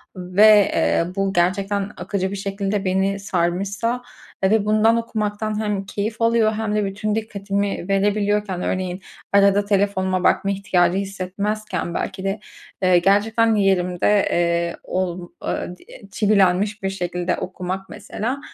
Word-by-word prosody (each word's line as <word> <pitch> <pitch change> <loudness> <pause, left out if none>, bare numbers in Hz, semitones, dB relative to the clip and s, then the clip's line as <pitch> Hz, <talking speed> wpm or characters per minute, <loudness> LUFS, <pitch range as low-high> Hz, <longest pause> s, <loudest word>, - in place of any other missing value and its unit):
ve, 200 +3 +5
eee, - - +2
bu 195 -1 0
gerçekten 195 +3 0
akıcı 190 -2 -2
bir - - -3
şekilde 195 0 -2
beni 190 +1 +1
sarmışsa 200 +6 -1 0.4
ve 205 +2 +3
bundan 215 +2 +3
okumaktan 215 -2 -2
hem 205 -2 -2
keyif 215 +3 -4
alıyor 230 -1 +3
hem 215 -1 -2
de 210 -1 +1
bütün 205 +2 -2
dikkatimi 200 -3 -2
verebiliyorken, 205 -1 +1
örneğin, 185 0 -2 0.3
arada 200 0 +4
telefonuma 190 -2 +1
bakma 195 - +2
ihtiyacı 185 -2 +1
hissetmezken, 195 0 -3
belki 190 +1 -4
de, 195 +2 -2 0.4
eee, 185 -1 +5
gerçekten 220 +5 +3
yerimde, 195 0 +2
eee, 170 0 +1
ol 180 -1 -3
eee, 180 - -3
di - - -21 0.3
çivilenmiş 200 0 +2
bir 195 - 0
şekilde 180 -1 -2
okumak, 185 +1 -5
mesela. 220 +5 -4
195 Hz, 130 wpm, -21 LUFS, 185-210 Hz, 0.4 s, ve